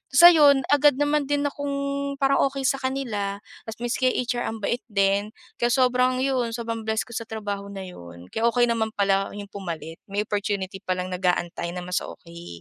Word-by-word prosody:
So 345 +4 +11
yun 285 -4 +6
agad 290 -1 +5
naman 290 0 +2
din 290 0 +1
akong 285 0 -4 0.5
parang 275 0 +4
okey 275 0 -5
sa 270 +1 +2
kanila 220 -7 -3 0.3
tas 225 - -5
miski 240 +2 0
HR 245 -1 0
ang 220 -1 -5
bait 240 - 0
din 200 0 +1 0.3
kaya 240 - +3
sobrang 255 0 +3
yun, 250 -4 0
sobrang 230 -2 -4
bless 220 0 +1
ko - - -21
sa 230 0 -4
trabaho 205 -2 -4
na 195 - -6
yun 85 - -11
kaya 225 - -1
okey 240 0 +3
naman 220 -1 0
pala 195 -1 +1
yung 205 -1 -8
pumalit 165 -4 -6
may 200 +1 -1
opportunity 200 -2 -2
palang 185 -1 -2
nag-aantay 175 -1 -1
na 180 - -5
mas 180 +1 -1
okey. 170 0 -11
220 Hz, 185 wpm, -25 LUFS, 195-255 Hz, 0.5 s, So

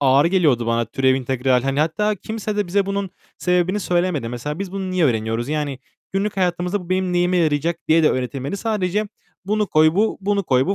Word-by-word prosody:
ağır 140 +1 +4
geliyordu 155 -10 +2
bana 115 0 +1
türev, 130 +1 +1
integral. 130 -1 +1
Hani, 135 +1 0
hatta 190 +7 +1
kimse 215 +1 -5
de 205 -3 0
bize 195 +2 +1
bunun 195 -1 -2 0.3
sebebini 180 +3 +1
söylemedi. 175 - 0
Mesela 135 +6 -5
biz 195 -2 -5
bunu 190 -1 -3
niye 180 -3 +2
öğreniyoruz? 115 0 0
Yani 145 -3 -2 0.3
günlük 200 +1 -1
hayatımızda 180 +1 0
bu 180 - -12
benim 185 -1 0
neyime 180 +1 +2
yarayacak 165 0 +1
diye 160 +1 +5
de 150 - +5
öğretilmedi. 130 - -3
Sadece, 210 -1 -1 0.4
"Bunu 210 +1 0
koy, 155 -1 +4
bu. 215 +3 +1
Bunu 200 0 0
koy, 130 -4 +2
bu. 195 - +1
175 Hz, 195 wpm, -21 LUFS, 135-195 Hz, 0.4 s, diye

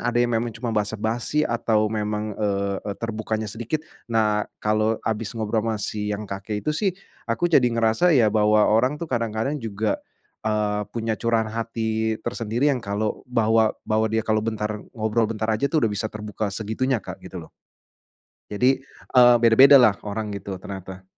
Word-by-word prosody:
ada 120 - -1
yang 120 0 +2
memang 115 -1 -1
cuma 115 -1 -3
basa-basi 110 +7 -1
atau 110 -3 +1
memang, 105 0 -2
eee 100 -1 -1
eee, 100 - -5
terbukanya 110 -1 -3
sedikit. 120 +9 -4 0.2
Nah, 105 -2 +1
kalau 110 +1 +1
habis 110 0 -2
ngobrol 110 0 0
sama 110 0 -1
si 105 0 -3
yang 105 - -7
kakek 100 +1 -5
itu 150 - +1
sih, 200 +6 0 0.4
aku 115 +9 -1
jadi 125 -4 +5
ngerasa 115 +8 +2
ya, 110 -4 +4
bahwa 105 0 +4
orang 125 +7 +2
tuh 170 - -5
kadang-kadang 120 +1 -2
juga, 110 -1 -2 0.5
eee, 105 -1 0 0.2
punya 115 -1 -1
curahan 110 -1 0
hati 110 -1 -1
tersendiri 120 +6 0
yang 125 - -2
kalau 105 +1 -2
bahwa 110 -2 +2
bahwa 110 +1 +1
dia 110 0 -1
kalau 110 -1 +1
bentar 105 -1 -3 0.2
ngobrol 110 0 +1
bentar 110 0 -1
aja 125 +6 0
tuh 155 -7 +1
udah 105 - +1
bisa 110 +2 -2
terbuka 105 -1 -4
segitunya, 110 +6 -1
Kak, - - -8
gitu - - -10
loh. - - -9 1.0
Jadi, 125 +6 +2 0.4
eee, 125 -1 +8
beda-bedalah 120 -2 +7
orang 105 +1 -3
gitu 100 -1 -5
ternyata. 95 -1 -8
110 Hz, 165 wpm, -23 LUFS, 105-115 Hz, 1.0 s, eee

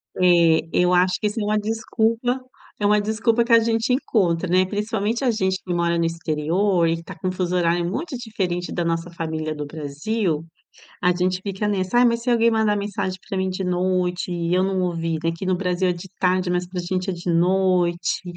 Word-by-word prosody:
É, 180 - +3 0.4
eu 180 0 +3
acho 180 +1 +3
que 215 - -3
isso 215 +2 -3
é - - -1
uma 210 +1 +1
desculpa. 225 +3 0 0.4
É 205 - 0
uma 210 0 +4
desculpa 225 +2 +1
que 235 - -4
a 230 - +8
gente 225 +2 +1
encontra, 185 -9 +1
né. 185 +1 +4
Principalmente 215 +4 -2
a 245 - +3
gente 190 -3 0
que 180 - -3
mora 170 0 +1
no 165 - +1
exterior 165 +3 0
e 165 - +1
que 165 - -8
está 165 - -10
com 185 - -4
um - - -1
fuso 180 -1 -2
horário 170 0 +1
muito 300 - -4
diferente 190 -7 -3
da 175 - -1
nossa 165 +1 -1
família 160 -2 -4
do 150 0 -5
Brasil. 155 +4 -2 0.6
A 180 0 +4
gente 180 +1 0
fica 200 +1 -3
nessa 195 +3 0
"ai, 250 - +6
mas 235 -1 +2
e - - -10
se 250 - +1
alguém 235 -1 +4
mandar 220 -2 +2
mensagem 200 -2 -3
para 195 - -2
mim 190 0 0
de 185 +1 -3
noite 180 0 0
e 170 0 -2
eu 185 - +3
não 190 -1 0
ouvir?", 165 -2 -1
"aqui 165 +2 -2
no 185 - +2
Brasil 180 0 0
é 180 - +2
de 175 +2 -9
tarde, 185 0 +1
mas 180 0 0
para 180 0 -5
a - - -6
gente 185 +2 -2
é - - -2
de 175 0 -4
noite". 180 0 +1
185 Hz, 225 wpm, -22 LUFS, 175-210 Hz, 0.6 s, a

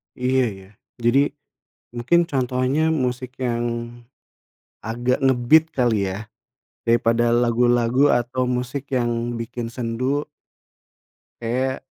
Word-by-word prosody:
Iya, 130 +1 +1 0.2
ya, 95 - -16 0.3
jadi 120 +3 +4 0.7
mungkin 120 +9 +2
contohnya 130 +1 0
musik 125 -3 -2
yang 120 -2 -1 1.2
agak 120 +3 -1
nge-beat 135 +4 +4
kali 115 -6 +1
ya, 100 +3 -6 0.6
daripada 115 0 +3
lagu-lagu 120 +2 +3
atau 125 +1 -1
musik 125 +2 -3
yang 120 0 -1
bikin 115 0 -5
sendu 125 +4 -2 1.2
kayak 130 +3 -2
125 Hz, 95 wpm, -22 LUFS, 120-130 Hz, 1.2 s, jadi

